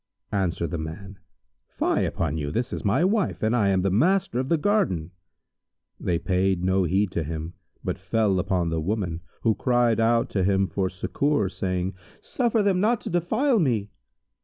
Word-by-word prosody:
Answered 85 -5 -1
the 85 - -2
man, 95 +5 -7 0.5
"Fie - - 0
upon 80 -3 -2
you! 75 -2 -2
This 120 - -2
is - - -4
my 110 - +2
wife 205 - 0
and 110 +2 +2
I 105 -5 +3
am 95 -1 +2
the 95 - +1
master 165 - +2
of 130 +1 -2
the 165 - +3
garden." 150 - 0 0.9
They 85 - 0
paid 95 0 0
no 95 0 +2
heed 95 +2 +1
to 85 - -1
him, 80 +2 -5 0.3
but - - -3
fell 105 -4 +1
upon 90 -2 0
the 80 -1 -1
woman, 90 -2 -2 0.2
who 115 - +3
cried 120 -1 +2
out 115 +1 +3
to 95 - 0
him 95 0 +2
for 95 0 -1
succour, 100 +4 0
saying, 90 0 -2 0.3
"Suffer 235 -4 0
them 195 -2 +2
not 220 +4 +2
to - - -6
defile 220 - +2
me!" 115 - 0
100 Hz, 180 wpm, -25 LUFS, 90-130 Hz, 0.9 s, I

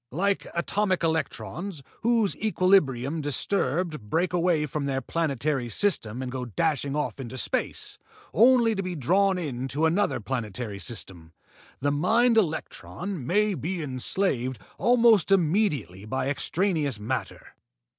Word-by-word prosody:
Like 195 +8 0
atomic 185 +2 0
electrons, 160 - -2 0.2
whose 230 -3 +2
equilibrium 165 - +2
disturbed 150 - -1
break 175 - +1
away 170 -3 +2
from 150 0 -3
their 135 -1 0
planetary 140 -4 -1
system 130 - 0
and 125 - -5
go 130 -1 -4
dashing 145 - -1
off 150 -1 -2
into 130 0 -6
space, - - -2 0.3
only 235 0 +5
to 195 - -2
be 185 -2 -4
drawn 190 +7 +2
into 135 -2 -2
another 180 +2 +1
planetary 110 -2 -4
system, 90 -8 -7 0.5
the 145 +1 +1
mind 225 +11 +3
electron 180 - -2
may 210 +4 +2
be 175 -1 -3
enslaved 130 -1 0 0.2
almost 230 -6 +4
immediately 155 - +1
by 130 +4 -1
extraneous 155 - 0
matter. 110 -1 -4
155 Hz, 125 wpm, -26 LUFS, 130-195 Hz, 0.5 s, only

